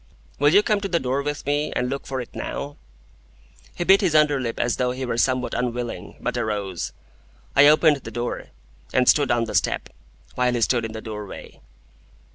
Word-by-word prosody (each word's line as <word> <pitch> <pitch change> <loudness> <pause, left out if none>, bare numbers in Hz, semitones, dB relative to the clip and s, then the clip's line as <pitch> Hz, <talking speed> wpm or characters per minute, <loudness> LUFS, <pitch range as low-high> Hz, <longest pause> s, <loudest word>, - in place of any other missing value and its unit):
"Will 145 +1 +5
you 200 +4 +6
come 210 -2 +1
to 195 - -2
the 170 -3 +1
door 130 +2 -1
with 145 +1 -4
me, 145 +1 0
and 125 - 0
look 135 +2 -4
for 135 -1 -3
it 120 - -10
now?" 145 +1 -5 1.0
He - - -2
bit 195 +3 +5
his 175 -6 +1
under 150 -2 +4
lip 115 -2 -3
as 120 - 0
though 125 -1 +1
he 130 +1 -3
were 120 - -2
somewhat 130 0 +1
unwilling, 120 -1 -3
but 125 +1 -2
arose. 105 -6 -3 0.6
I 145 +1 +8
opened 155 0 +5
the 135 - -9
door, 120 0 -4 0.5
and 125 -1 +3
stood 145 -3 +5
on 120 -1 +2
the 115 - -5
step, - - 0 0.4
while 125 -1 +1
he 120 - -1
stood 115 +1 +2
in 110 - -6
the 110 - -6
doorway. 105 -3 -8
125 Hz, 200 wpm, -23 LUFS, 120-145 Hz, 1.0 s, I